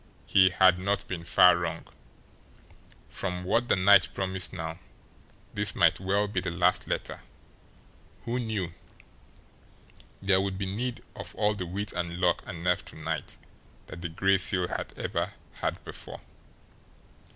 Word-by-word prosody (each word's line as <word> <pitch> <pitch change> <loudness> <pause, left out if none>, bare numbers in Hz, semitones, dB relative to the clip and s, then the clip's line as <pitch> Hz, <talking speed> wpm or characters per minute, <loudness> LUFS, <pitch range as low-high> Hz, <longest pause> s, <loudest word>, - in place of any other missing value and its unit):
He 95 -1 +5
had 90 0 +5
not 100 +2 -1
been 85 -3 -5
far 90 +1 +6
wrong. 85 -1 -4 1.2
From 90 -2 -4
what 115 +6 +1
the - - +4
night 95 0 +6
promised 95 -2 0
now, 80 +1 -5 0.7
this 105 -1 +1
might 85 -4 +4
well 100 +2 +1
be 100 -2 -1
the 90 - -2
last 90 +1 +1
letter. - - -3 1.0
Who 120 +2 -1
knew? 110 -7 -2 1.5
There 95 -1 +3
would 95 -1 -2
be 100 - -2
need 115 +6 -3
of - - -8
all 105 0 +2
the 95 -4 -5
wit 100 +4 -4
and 85 -1 -3
luck 90 -1 +2
and 85 -1 -7
nerve 90 0 +1
to - - -10
night - - -4 0.5
that 85 - -10
the 85 - -3
Gray 95 +4 +2
Seal 90 -1 +1
had - - -4
ever - - -2 0.3
had - - -2
before. - - -9
95 Hz, 150 wpm, -28 LUFS, 90-100 Hz, 1.5 s, far